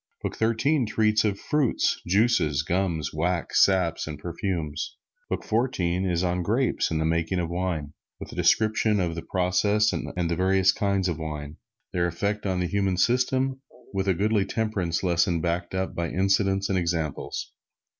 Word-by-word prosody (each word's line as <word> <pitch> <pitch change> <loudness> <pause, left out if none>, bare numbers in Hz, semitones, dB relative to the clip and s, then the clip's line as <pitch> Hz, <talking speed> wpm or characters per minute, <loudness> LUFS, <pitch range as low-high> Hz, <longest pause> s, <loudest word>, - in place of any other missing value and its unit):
Book - - -3
Thirteen 115 +4 +1
treats 110 0 +2
of 100 -2 0
fruits, 150 -5 +1
juices, 90 - +2
gums, 85 -3 -1
wax, 85 +2 +2
saps 90 -5 +1
and 75 -1 -5
perfumes. 85 -2 -4 0.3
Book - - -2
Fourteen 95 -6 0
is 85 0 0
on 90 0 0
grapes 115 +9 +1
and 80 - -1
the 80 - 0
making 80 +3 0
of 85 -1 -2
wine, 85 -5 -2 0.3
with - - -8
a - - -9
description 110 -1 +2
of 85 -3 0
the 85 - -5
process 100 +5 +1
and - - -3 0.2
the 85 - 0
various 95 +1 +3
kinds 100 -2 0
of 85 -2 -2
wine, 75 -1 -6 0.4
their 85 -1 +1
effects 100 +5 -2
on 95 -1 0
the - - 0
human 95 -1 0
system, 130 +5 +1 0.3
with 95 0 -1
a 95 - +3
goodly 105 +2 +2
temperance 100 -6 -2
lesson 85 -1 +2
backed 85 +2 -2
up 95 0 -2
by 85 -1 -2
incidents 95 +1 +1
and 95 -1 +1
examples. 80 -4 -3
95 Hz, 165 wpm, -26 LUFS, 85-105 Hz, 0.4 s, various